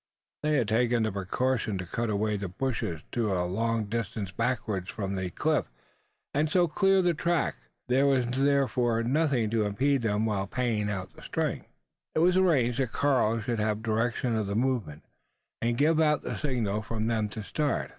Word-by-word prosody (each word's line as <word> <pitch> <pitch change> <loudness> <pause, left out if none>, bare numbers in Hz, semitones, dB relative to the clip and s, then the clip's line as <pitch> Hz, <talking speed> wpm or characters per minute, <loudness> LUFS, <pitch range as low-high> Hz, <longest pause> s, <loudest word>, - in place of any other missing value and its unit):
They 150 0 +1
had 125 -6 +2
taken 120 +1 +2
the 110 - 0
precaution 105 +3 -1
to 90 - -4
cut 115 +7 -2
away 105 0 0
the 100 -2 -4
bushes 95 - -2
to 115 -4 0
a 90 -1 0
long 115 +4 0
distance 105 -3 -3
backwards 105 -4 -2
from 100 -2 -3
the 95 -1 -2
cliff, - - 0 0.7
and 150 +2 +1
so 175 +2 +3
clear 195 +3 +3
the 175 -1 +3
track: 170 +1 0 0.3
there 130 +3 +3
was 130 -3 +3
therefore 130 -3 +2
nothing 130 -4 +1
to 115 -2 +2
impede 135 +6 +1
them 110 -1 +1
while 100 -3 -1
paying 110 -3 -1
out 95 -3 -4
the - - -15
string. - - -2 0.5
It - - +2
was 180 0 +4
arranged 140 -10 +3
that 130 -4 0
Karl 120 -6 +2
should 115 +1 -2
have 105 0 -1
direction 115 +2 0
of 110 -2 -1
the 100 - -2
movement, 115 - -1 0.6
and 120 0 0
give 155 +3 +3
out 150 -2 +3
the - - -3
signal 115 -8 -1
for 110 +1 -5
them 110 -1 0
to 110 +1 -6
start. 150 +7 -1
115 Hz, 185 wpm, -28 LUFS, 105-135 Hz, 0.7 s, was